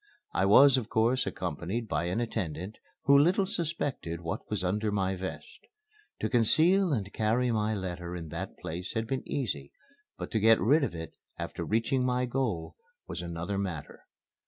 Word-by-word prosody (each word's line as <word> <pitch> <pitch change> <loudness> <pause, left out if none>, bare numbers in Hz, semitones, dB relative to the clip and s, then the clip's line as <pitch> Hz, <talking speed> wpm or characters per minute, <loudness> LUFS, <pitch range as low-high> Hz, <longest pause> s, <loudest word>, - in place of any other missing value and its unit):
I 95 - +2
was 135 +6 +8
of 115 -3 -3
course 120 +4 +2
accompanied 90 +7 -3
by 75 -2 -1
an 90 +5 -1
attendant, 100 -4 -3 0.2
who 140 - +6
little 175 +7 +5
suspected 150 - -3
what 85 -1 -5
was 105 -4 -2
under 105 +4 0
my 95 -2 0
vest. 95 - -7 0.6
To - - +1
conceal 165 - +4
and 105 -7 -2
carry 115 +3 +1
my 110 -1 +1
letter 90 -2 -4
in 85 -3 -6
that 85 +5 -5
place 85 +3 -5
had 110 0 0
been 130 +2 -2
easy; 95 - -3 0.5
but - - -6
to 110 - +1
get 110 +1 +6
rid 145 +7 +4
of 135 - -2
it 80 0 -6 0.2
after - - -4
reaching 115 +4 +1
my 125 0 +1
goal 120 -10 -2 0.3
was - - -4
another 85 +3 -3
matter. 90 -7 -5
110 Hz, 170 wpm, -30 LUFS, 90-125 Hz, 0.6 s, was